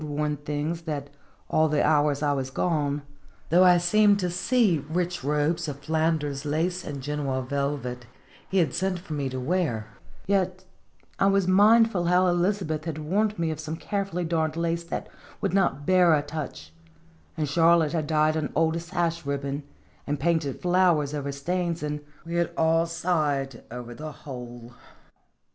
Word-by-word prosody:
59 150 Hz, -1 st, -5 dB
worn 150 Hz, -1 st, 0 dB
things, 150 Hz, +3 st, -3 dB
that 145 Hz, -4 st, -5 dB, 0.4 s
all 155 Hz, 0 st, +2 dB
the 150 Hz, -1 st, +2 dB
hours 150 Hz, -1 st, +2 dB
I 145 Hz, -1 st, +2 dB
was 135 Hz, -1 st, -2 dB
gone, 145 Hz, -1 st, -1 dB, 0.5 s
though 175 Hz, +3 st, +6 dB
I 180 Hz, -1 st, +7 dB
seemed 205 Hz, +4 st, +4 dB
to 180 Hz, -1 st, -1 dB
see 185 Hz, -, +2 dB
rich 175 Hz, -1 st, -1 dB
robes 150 Hz, +4 st, 0 dB
of 145 Hz, -2 st, -4 dB
Flanders 155 Hz, -2 st, 0 dB
lace 165 Hz, +5 st, -1 dB
and 140 Hz, -2 st, -6 dB
Genoa 140 Hz, -2 st, -2 dB
velvet 130 Hz, -3 st, -3 dB, 0.4 s
he 195 Hz, -, 0 dB
had 170 Hz, -4 st, +2 dB
sent 190 Hz, 0 st, 0 dB
for 170 Hz, -3 st, -8 dB
me 140 Hz, -2 st, -2 dB
to 130 Hz, 0 st, -4 dB
wear, 135 Hz, -6 st, -1 dB, 0.4 s
yet 185 Hz, -1 st, 0 dB, 0.5 s
I 195 Hz, -, +4 dB
was 195 Hz, -2 st, +2 dB
mindful 205 Hz, 0 st, +5 dB
how 180 Hz, +2 st, +4 dB
Elizabeth 175 Hz, -3 st, 0 dB
had 160 Hz, -2 st, -3 dB
warned 200 Hz, +7 st, 0 dB
me 165 Hz, -1 st, 0 dB
of 155 Hz, -, -5 dB
some 155 Hz, +1 st, -4 dB
carefully 195 Hz, -1 st, -3 dB
darned 160 Hz, -1 st, 0 dB
lace 170 Hz, 0 st, -1 dB
that 170 Hz, -, -4 dB, 0.3 s
would -, -, -1 dB
not 175 Hz, -7 st, +1 dB
bear 180 Hz, -2 st, +5 dB
a 145 Hz, -, 0 dB
touch, 150 Hz, -2 st, -7 dB, 0.6 s
and 155 Hz, -2 st, 0 dB
Charlotte 165 Hz, +1 st, +4 dB
had 155 Hz, -3 st, -1 dB
dyed 155 Hz, 0 st, +2 dB
an 155 Hz, -2 st, -2 dB
old 165 Hz, +1 st, +2 dB
sash 170 Hz, -1 st, -2 dB
ribbon, 140 Hz, 0 st, -3 dB, 0.5 s
and 145 Hz, -1 st, -1 dB
painted 160 Hz, -3 st, 0 dB
flowers 175 Hz, -5 st, +3 dB
over 140 Hz, -1 st, -3 dB
stains, 170 Hz, +3 st, -2 dB
and 150 Hz, 0 st, -2 dB, 0.3 s
we 170 Hz, -, -6 dB
had 170 Hz, -1 st, +1 dB
all 165 Hz, +1 st, +3 dB
sighed 150 Hz, -7 st, -1 dB
over 120 Hz, 0 st, -7 dB
the 155 Hz, +5 st, -7 dB
whole. 120 Hz, -4 st, -9 dB
160 Hz, 165 wpm, -26 LUFS, 145-175 Hz, 0.6 s, I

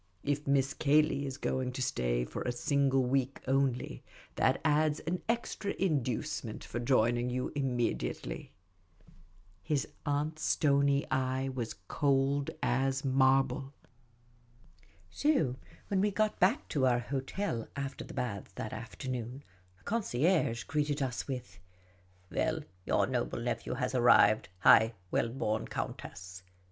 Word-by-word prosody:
If 145 Hz, 0 st, -1 dB
Miss 140 Hz, -1 st, +2 dB
Cayley 145 Hz, -1 st, +2 dB
is 135 Hz, 0 st, -5 dB
going 130 Hz, -2 st, -1 dB
to 130 Hz, -, -4 dB
stay -, -, 0 dB
for -, -, -6 dB
a 125 Hz, -, -1 dB
single 135 Hz, +1 st, +2 dB
week 130 Hz, +1 st, 0 dB
only, 135 Hz, -2 st, 0 dB, 0.3 s
that -, -, +2 dB
adds 150 Hz, 0 st, +3 dB
one 180 Hz, +2 st, -1 dB
extra 230 Hz, -3 st, -1 dB
inducement 130 Hz, -, -1 dB
for 120 Hz, -, -5 dB
joining 120 Hz, 0 st, +2 dB
you 125 Hz, +1 st, -2 dB
immediately." 120 Hz, -, -2 dB, 1.1 s
His 150 Hz, -4 st, -1 dB, 0.2 s
aunt's 150 Hz, +1 st, -1 dB
stony 140 Hz, -2 st, +3 dB
eye 130 Hz, 0 st, 0 dB
was 125 Hz, -4 st, -4 dB
cold 140 Hz, 0 st, +1 dB
as 135 Hz, +2 st, +1 dB
marble. 135 Hz, +1 st, +2 dB, 1.4 s
So 215 Hz, -, +1 dB, 0.3 s
when 195 Hz, -2 st, +1 dB
we 210 Hz, -, +3 dB
got 215 Hz, +1 st, 0 dB
back 195 Hz, +9 st, +3 dB
to 130 Hz, -3 st, +2 dB
our 120 Hz, -1 st, +3 dB
hotel 135 Hz, -, -3 dB
after 140 Hz, -1 st, -4 dB
the -, -, -10 dB
baths 100 Hz, -5 st, -4 dB
that 110 Hz, -, -5 dB
afternoon, 125 Hz, +3 st, -5 dB, 0.3 s
the -, -, -27 dB
concierge 165 Hz, -, +1 dB
greeted 145 Hz, 0 st, 0 dB
us 125 Hz, -2 st, -3 dB
with: 125 Hz, -7 st, -6 dB, 0.3 s
" 90 Hz, 0 st, -32 dB
Well, 160 Hz, 0 st, 0 dB, 0.3 s
your -, -, +3 dB
noble -, -, -2 dB
nephew -, -, -2 dB
has 130 Hz, 0 st, -2 dB
arrived, 110 Hz, -5 st, +5 dB
high 110 Hz, +1 st, +7 dB, 0.2 s
well 115 Hz, -, +1 dB
born 110 Hz, -3 st, -2 dB
countess 90 Hz, -1 st, -6 dB
135 Hz, 130 wpm, -32 LUFS, 120-145 Hz, 1.4 s, high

